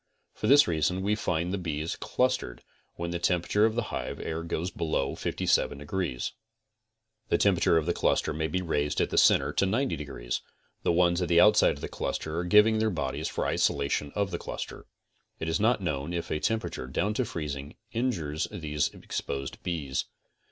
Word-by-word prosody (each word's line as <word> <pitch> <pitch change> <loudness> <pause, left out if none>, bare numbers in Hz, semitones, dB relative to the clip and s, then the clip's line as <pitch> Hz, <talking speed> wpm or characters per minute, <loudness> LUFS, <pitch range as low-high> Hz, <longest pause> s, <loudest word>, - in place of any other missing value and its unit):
For - - -3
this 145 +2 +7
reason 85 +3 0
we 105 +2 +2
find 90 -4 -1
the 100 - -1
bees 80 -2 -3
clustered 125 - -1 0.3
when 85 0 -4
the 85 - -2
temperature 90 +4 +2
of 110 - -3
the 120 -2 -2
hive - - -4
air 80 +1 -3
goes 85 +2 -3
below 80 -4 -1
57 - - 0
degrees. 75 -3 -3 1.0
The - - +3
temperature 90 -4 +3
of 80 - +1
the 85 - +1
cluster - - +1
may 80 +1 -1
be 90 +3 -2
raised 75 -3 0
at - - +1
the - - -1
center - - +4
to - - +2
90 110 -1 +1
degrees, - - -4 0.4
the - - +2
ones 85 +1 +3
at 90 - 0
the 85 -1 +5
outside 105 +2 +6
of - - -12
the - - -3
cluster 80 0 -3
are 90 - -2
giving 105 +4 +5
their 110 0 +2
bodies 70 -4 -2
for - - -2
isolation 70 +1 0
of 100 -1 0
the 85 - -3
cluster. - - -6 0.5
It 80 - -3
is 80 - 0
not 110 -1 +2
known 75 0 -2
if 85 - -4
a 75 - 0
temperature 110 - -2
down 100 +11 0
to 130 - +1
freezing 75 - -5 0.2
injures 85 - -1
these 75 -3 -1
exposed 70 -1 -5
bees. 75 -7 -2
85 Hz, 185 wpm, -28 LUFS, 75-100 Hz, 1.0 s, this